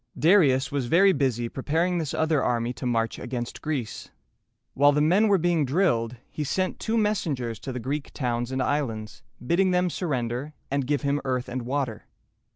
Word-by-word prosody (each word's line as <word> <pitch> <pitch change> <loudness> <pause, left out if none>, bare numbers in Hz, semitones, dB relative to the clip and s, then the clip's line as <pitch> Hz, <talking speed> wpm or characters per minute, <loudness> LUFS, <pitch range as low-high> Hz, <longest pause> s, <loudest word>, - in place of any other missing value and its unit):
Darius 150 -7 +4
was 140 -4 -1
very 190 +7 +5
busy 130 -5 0
preparing 165 +8 0
this 155 -4 -2
other 160 -3 +2
army 120 0 0
to 125 +1 -5
march 115 -2 0
against 120 -1 -5
Greece. 140 -8 -4 0.6
While 145 +1 +5
the 145 - +2
men 180 +9 +4
were 200 -2 +4
being 170 -2 +2
drilled, 130 -6 +1
he 150 - -3
sent 185 +6 -1
two 225 +1 -1
messengers 150 - -1
to 135 - -6
the 125 - -4
Greek 140 +4 -3
towns 120 -1 -2
and 130 0 0
islands, 115 -8 -2 0.2
bidding 185 +7 +3
them 180 -1 +2
surrender 135 -3 -2 0.2
and 140 -2 0
give 145 0 0
him 140 +1 0
earth 130 -1 -1
and 130 0 -4
water. 125 -3 -3
140 Hz, 175 wpm, -26 LUFS, 125-165 Hz, 0.6 s, very